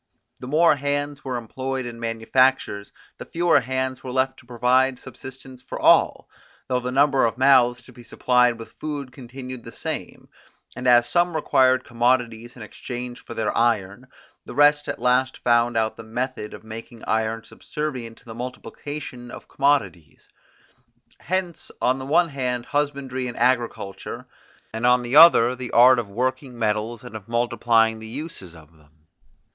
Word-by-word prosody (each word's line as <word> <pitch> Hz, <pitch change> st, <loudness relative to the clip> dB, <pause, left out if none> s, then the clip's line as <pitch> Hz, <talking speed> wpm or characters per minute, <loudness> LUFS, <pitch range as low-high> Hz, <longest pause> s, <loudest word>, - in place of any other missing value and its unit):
The 125 Hz, -, -8 dB
more 155 Hz, +2 st, +4 dB
hands 145 Hz, +1 st, -3 dB
were 130 Hz, -2 st, -3 dB
employed 130 Hz, +3 st, -4 dB
in 120 Hz, -1 st, -8 dB
manufactures, 115 Hz, -1 st, 0 dB, 0.3 s
the -, -, -7 dB
fewer 170 Hz, -3 st, +2 dB
hands 130 Hz, 0 st, -3 dB
were 130 Hz, -, -6 dB
left 130 Hz, +1 st, 0 dB
to 120 Hz, -, -20 dB
provide 125 Hz, +2 st, +2 dB
subsistence 130 Hz, 0 st, -11 dB
for -, -, -7 dB
all, -, -, +4 dB, 0.4 s
though 125 Hz, -1 st, 0 dB
the 125 Hz, 0 st, -4 dB
number 135 Hz, 0 st, +3 dB
of 115 Hz, 0 st, 0 dB
mouths 125 Hz, -2 st, +4 dB
to 125 Hz, -, -16 dB
be 120 Hz, -, -14 dB
supplied 125 Hz, 0 st, +2 dB
with 115 Hz, -, -11 dB
food 145 Hz, -4 st, -5 dB
continued 130 Hz, -1 st, -9 dB
the -, -, -10 dB
same; -, -, -6 dB, 0.5 s
and 125 Hz, 0 st, -4 dB
as 120 Hz, -1 st, +5 dB
some 175 Hz, +2 st, +1 dB
required 130 Hz, -4 st, +3 dB
commodities 120 Hz, -1 st, -1 dB
in 120 Hz, -, -10 dB
exchange 120 Hz, +2 st, -7 dB
for -, -, -9 dB
their 110 Hz, -1 st, -1 dB
iron, 115 Hz, 0 st, 0 dB, 0.4 s
the -, -, -10 dB
rest 145 Hz, 0 st, +4 dB
at -, -, -3 dB
last 125 Hz, +2 st, +1 dB
found 120 Hz, -1 st, +2 dB
out 110 Hz, 0 st, 0 dB
the 115 Hz, -, -9 dB
method 115 Hz, -1 st, -4 dB
of -, -, -14 dB
making 115 Hz, +1 st, -10 dB
iron 110 Hz, +1 st, -1 dB
subservient 130 Hz, -5 st, -6 dB
to -, -, -22 dB
the 115 Hz, -, -9 dB
multiplication 125 Hz, +1 st, -7 dB
of -, -, -11 dB
commodities. 100 Hz, -, -1 dB, 0.9 s
Hence 180 Hz, -1 st, -3 dB
on 130 Hz, +1 st, +1 dB
the 130 Hz, -, -7 dB
one 170 Hz, +3 st, +3 dB
hand 125 Hz, -3 st, -3 dB
husbandry 140 Hz, -3 st, -2 dB
and 120 Hz, -, -7 dB
agriculture, 120 Hz, -5 st, -1 dB, 0.5 s
and 110 Hz, +1 st, -5 dB
on 125 Hz, 0 st, +4 dB
the 120 Hz, +3 st, -2 dB
other 150 Hz, -7 st, +8 dB
the 125 Hz, -1 st, -6 dB
art 125 Hz, +1 st, +6 dB
of 110 Hz, -4 st, -5 dB
working 130 Hz, +3 st, -3 dB
metals 110 Hz, +1 st, -2 dB
and 120 Hz, -3 st, -10 dB
of 110 Hz, -1 st, -9 dB
multiplying 115 Hz, -1 st, +1 dB
the 110 Hz, -, -9 dB
uses 115 Hz, -, -8 dB
of 80 Hz, 0 st, -17 dB
them. 75 Hz, 0 st, -26 dB
125 Hz, 165 wpm, -23 LUFS, 115-130 Hz, 0.9 s, other